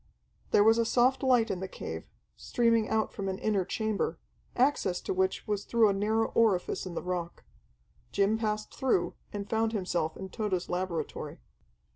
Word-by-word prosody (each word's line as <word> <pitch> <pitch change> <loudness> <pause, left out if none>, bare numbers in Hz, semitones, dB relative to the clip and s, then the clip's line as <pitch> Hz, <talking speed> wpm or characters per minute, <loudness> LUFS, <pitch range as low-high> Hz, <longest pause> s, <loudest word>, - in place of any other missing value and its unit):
There 205 - +5
was 225 +2 +5
a - - +4
soft 250 +3 +3
light 250 -4 +3
in 185 - -2
the 190 - -4
cave, - - -6 0.3
streaming 230 -2 +1
out 220 0 0
from 195 -2 -3
an 190 - -2
inner 205 -2 +1
chamber, 215 +2 -1 0.4
access 250 -9 +2
to - - -2
which 190 0 0
was 205 -1 -1
through 230 -3 +4
a - - +2
narrow 215 +3 +1
orifice 200 -5 +1
in 175 - -7
the - - -3
rock. 180 -1 -4 0.7
Jim 205 +3 +2
passed 215 -1 -2
through, 185 -10 +1 0.2
and 200 -1 -5
found 225 +1 0
himself 175 -6 -1
in 190 - -7
Tode's 190 -4 -2
laboratory. 180 -2 -3
210 Hz, 170 wpm, -30 LUFS, 185-225 Hz, 0.7 s, There